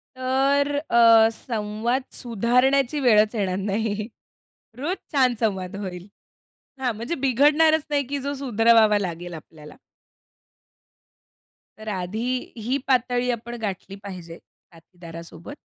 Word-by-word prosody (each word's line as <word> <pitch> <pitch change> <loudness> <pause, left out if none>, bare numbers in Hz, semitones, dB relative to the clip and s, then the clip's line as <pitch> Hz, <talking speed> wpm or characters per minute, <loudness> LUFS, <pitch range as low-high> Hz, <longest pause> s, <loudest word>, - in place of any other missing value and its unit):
तर 270 +2 +1 0.2
अ, 230 -1 +6
संवाद 225 +2 -2
सुधारण्याची 250 +4 +1
वेळच 215 -3 +4
येणार 190 -3 -1
नाही. 210 +1 -2 0.7
रोज 325 +9 -2 0.2
छान 255 -4 +3
संवाद 190 -5 -2
होईल. 185 -2 -7 0.7
हां, 255 -3 -1
म्हणजे 235 +10 -4
बिघडणारच 300 +4 +4
नाही 285 -1 +1
की 280 +1 -3
जो 280 +2 -3
सुधरवावा 225 -4 +4
लागेल 175 -2 -5
आपल्याला. 155 -1 -12 2.0
तर 215 0 -12
आधी 195 +3 -3 0.3
ही 240 +5 -1
पातळी 250 -1 +1
आपण 235 0 -6
गाठली 195 -2 -5
पाहिजे 175 -4 -9
साथीदारासोबत, 170 - -13
225 Hz, 105 wpm, -23 LUFS, 195-260 Hz, 2.0 s, अ